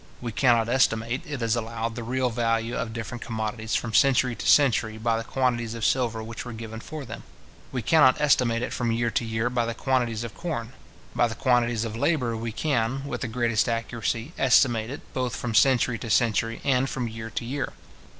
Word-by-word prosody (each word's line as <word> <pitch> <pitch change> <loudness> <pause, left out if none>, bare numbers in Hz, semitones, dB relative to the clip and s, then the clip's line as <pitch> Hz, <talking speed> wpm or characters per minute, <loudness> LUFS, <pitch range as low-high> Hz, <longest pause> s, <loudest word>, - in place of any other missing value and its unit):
We 120 -2 -4
cannot 115 0 +3
estimate, 120 0 +1
it 145 -5 -4
is 115 0 +2
allowed, 115 0 -3
the 120 - -6
real 125 +2 -1
value 115 0 0
of 115 - -3
different 115 +1 -6
commodities 110 0 -3
from 115 -2 -2
century 130 -1 +4
to - - -5
century 115 -6 +4
by 115 +1 0
the 115 - -2
quantities 120 -2 -1
of 115 -3 -2
silver 115 -3 +1
which 115 +1 -7
were 120 - -7
given 110 0 -7
for 150 +4 -7
them. - - -8 0.5
We 125 -3 -3
cannot 130 -1 +5
estimate 125 -5 +2
it - - -3
from 120 -2 -1
year 115 +1 0
to - - 0
year 110 +1 -1
by 120 -2 0
the 115 - -3
quantities 120 -4 0
of 115 - -6
corn. 135 -9 -5 0.4
By 120 - +3
the 115 - -6
quantities 120 -2 +1
of 110 -1 -5
labour, 125 -2 +1
we 115 0 -4
can, 135 0 -1
with 140 - -4
the 125 - -2
greatest 115 0 +1
accuracy, 115 +4 -2
estimate 120 -4 +4
it, 145 +4 -6
both 125 -2 -2
from 120 -2 -4
century 125 -1 +3
to 115 - -6
century, 115 +1 +1
and 135 -1 +2
from 125 -3 -3
year 110 0 -7
to 115 - -4
year. 135 +3 -3
120 Hz, 205 wpm, -26 LUFS, 115-125 Hz, 0.5 s, cannot